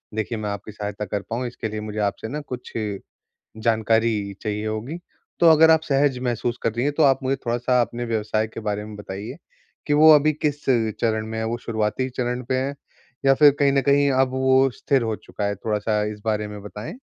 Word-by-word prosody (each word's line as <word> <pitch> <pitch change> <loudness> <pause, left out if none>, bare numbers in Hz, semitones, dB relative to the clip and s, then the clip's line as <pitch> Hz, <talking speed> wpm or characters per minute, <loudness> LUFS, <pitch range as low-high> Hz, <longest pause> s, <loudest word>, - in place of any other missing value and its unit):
देखिए 110 +1 -2
मैं 105 -1 -3
आपकी 100 +1 -6
सहायता 105 0 -5
कर 100 0 -3
पाऊँ 125 +2 -2
इसके 120 -2 -5
लिए 110 0 -4
मुझे 105 0 -5
आपसे 105 +2 -1
ना 150 +6 -4
कुछ 125 -3 -8 0.9
जानकारी 110 -2 +1
चाहिए 105 0 -3
होगी। 110 +10 -4 0.4
तो 170 - +7
अगर 160 +1 +7
आप 160 - +5
सहज 140 -3 +1
महसूस 120 -1 -1
कर 115 - +1
रही 120 +3 -1
हैं 145 - +1
तो 160 - +3
आप 135 -2 +5
मुझे 135 +1 0
थोड़ा-सा 120 +1 +1
अपने 120 +1 -4
व्यवसाय 110 -1 -1
के 110 - -8
बारे 105 -1 -3
में 105 - -9
बताइए, 105 +5 -7 0.5
कि 145 - 0
वो 155 +1 +8
अभी 150 +1 +4
किस 145 -1 -2 0.4
चरण 110 -1 0
में 110 0 -5
है? 110 - -1
वो 115 +1 -1
शुरुआती 110 +2 -1
चरण 125 0 -2
पर 130 +2 -2
है 135 +2 -1 0.5
या 135 0 +6
फिर 145 +1 +7
कहीं 140 -1 +3
न 140 - +3
कहीं 140 +1 +3
अब 135 - +2
वो 130 0 +3
स्थिर 135 -3 +1
हो 110 -2 -1
चुका 105 - -6
है? 100 0 0
थोड़ा-सा 105 +1 -1
इस 105 - -11
बारे 105 -1 0
में 105 0 -8
बताएँ। 105 - -8
115 Hz, 215 wpm, -23 LUFS, 105-135 Hz, 0.9 s, वो